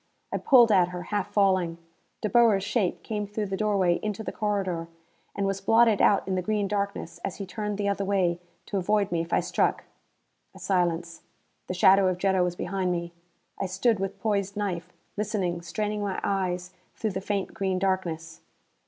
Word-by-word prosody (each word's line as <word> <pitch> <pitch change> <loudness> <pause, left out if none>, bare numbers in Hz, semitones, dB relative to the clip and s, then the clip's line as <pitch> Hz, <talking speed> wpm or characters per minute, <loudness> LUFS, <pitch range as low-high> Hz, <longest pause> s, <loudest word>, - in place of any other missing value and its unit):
I - - -1
pulled 240 -4 +6
at 185 -3 +5
her, 180 0 -6
half 205 0 -1
falling. 185 -5 +2 0.4
De - - 0
Boer's 225 -5 +4
shape 205 -2 -1
came 210 -2 -3
through 210 +1 -3
the 195 -1 -3
doorway 190 -4 +2
into 215 0 -3
the 185 - -4
corridor. 190 -6 -2 0.5
And 200 - -1
was 195 0 -1
blotted 225 +1 +4
out 200 -2 +4
in 190 - -1
the 185 - 0
green 210 +1 0
darkness 200 -4 -3
as 195 - -3
he 200 - -6
turned 210 +1 -4
the 205 -1 -1
other 200 0 0
way, 185 -3 +1 0.3
to 200 - -3
avoid 205 +1 +1
me 170 -1 +1
if 165 - -7
I - - +3
struck. - - 0 0.7
A - - -12
silence. 170 -3 -1 0.5
The 185 - -3
shadow 190 +1 +6
of 185 -1 0
Jetta 190 0 +2
was 175 -1 -1
behind 185 0 -1
me. 170 -1 -3 0.5
I 195 - -1
stood 190 +4 +1
with 195 +1 -3
poised 200 -1 -1
knife, 180 -4 -3 0.3
listening, 195 -5 -1
straining 210 +5 -3
my 200 -2 -2
eyes 185 -2 -1 0.2
through 220 - -2
the 190 0 -4
faint 200 -1 -2
green 190 -1 -1
darkness. 175 -4 -2
195 Hz, 190 wpm, -27 LUFS, 180-205 Hz, 0.7 s, pulled